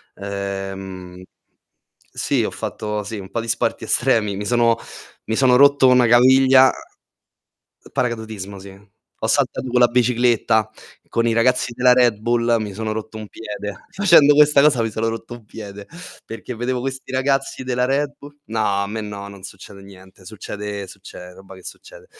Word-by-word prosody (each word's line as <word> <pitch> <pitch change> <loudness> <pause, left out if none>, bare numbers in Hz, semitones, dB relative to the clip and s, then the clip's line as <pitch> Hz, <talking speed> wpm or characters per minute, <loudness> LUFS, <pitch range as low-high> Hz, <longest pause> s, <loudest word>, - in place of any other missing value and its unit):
Ehm 95 -2 -6 0.9
sì, - - 0
ho - - -1
fatto, 105 -1 -5
sì, 105 +1 -6
un 95 -1 -10
po' 110 - -3
di 115 - -8
sporti - - -1
estremi. 115 -5 +1
Mi 105 - -5
sono 120 +1 +2 0.5
mi 110 - -2
sono 125 0 +4
rotto 140 -1 +5
una 125 -1 +5
caviglia 130 +2 +6 1.2
paracadutismo, 110 -5 -4
sì. 100 +1 -11 0.5
Ho - - -1
saltato 130 - 0
con 125 0 +2
la 120 - +7
bicicletta 120 -3 +1 0.4
con 115 0 0
i 115 - +2
ragazzi 120 +1 +1
della 125 +1 +4
Red 120 -3 +3
Bull, 120 +1 +1
mi 105 -2 -5
sono 110 +1 -3
rotto 110 0 -6
un 110 - -8
piede. 105 -2 -8
Facendo 170 -7 +5
questa 150 -1 +5
cosa 140 -5 +3
mi 115 - -2
sono 110 +1 -2
rotto 115 +1 -6
un 120 -2 -13
piede, 100 -1 -10 0.4
perché 115 +2 -8
vedevo 125 +2 -2
questi 130 0 -6
ragazzi 135 0 -1
della 125 -1 0
Red 140 +2 -1
Bull 145 0 -13
No, 105 -3 0
a - - -3
me 110 +2 -5
no, 100 -1 -7
non 100 -1 -13
succede 100 +1 -11
niente, 95 -1 -16
succede 105 -1 -7
succede 90 -1 -12
roba 95 +1 -14
che 95 - -16
succede. - - -12
115 Hz, 170 wpm, -20 LUFS, 100-125 Hz, 1.2 s, la